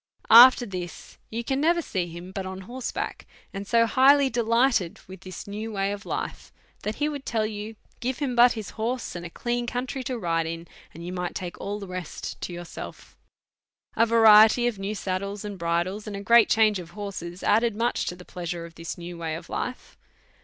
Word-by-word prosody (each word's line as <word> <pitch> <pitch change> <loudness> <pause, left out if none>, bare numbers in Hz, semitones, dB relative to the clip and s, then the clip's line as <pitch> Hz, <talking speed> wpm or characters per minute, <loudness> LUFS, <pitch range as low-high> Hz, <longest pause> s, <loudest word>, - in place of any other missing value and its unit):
After 245 +2 +9
this, 180 -4 -7
you 230 +2 -4
can 265 +3 -1
never 340 +3 +3
see 185 - -2
him 175 +2 -9
but 195 0 -4
on 190 0 -6
horseback, 245 +6 -5 0.3
and 195 0 -6
so 230 -1 +4
highly 270 +3 +5
delighted 230 -5 +2
with 190 0 -11
this 185 -2 -8
new 215 +2 -5
way 195 -1 -1
of 205 0 -7
life, - - -4 0.3
that 210 +1 -3
he 295 - 0
would 290 -2 -4
tell 225 -4 0
you, 215 +1 -5 0.2
give 250 +2 -2
him 270 -4 -2
but 240 +1 +7
his 220 -4 -6
horse 230 +1 -3
and 175 0 -5
a - - -12
clean 240 +6 -2
country 255 +2 -3
to 255 - -2
ride 165 -5 0
in, 165 +1 -6 0.2
and 170 +2 -10
you 180 - -5
might 180 -1 -3
take 180 -2 -6
all 205 +1 -3
the 200 - -7
rest 180 -3 -6
to - - -4
yourself. 175 -1 -9 0.8
A 230 - +4
variety 225 +1 +7
of 235 -5 -1
new 200 +2 -3
saddles 200 +1 -3
and 200 -2 -6
bridles, 175 +5 -1
and 205 - -5
a 200 - -5
great 235 +2 +6
change 215 -3 +4
of 170 -2 -9
horses, 185 -3 -6
added 225 +1 +3
much 235 +3 0
to 180 - -3
the 180 0 -13
plea 175 -1 -7
sure 170 0 -4
of 170 - -12
this 165 0 -6
new 175 0 -8
way 160 -1 -3
of 170 +1 -9
life. 250 - -5
205 Hz, 210 wpm, -26 LUFS, 180-235 Hz, 0.8 s, After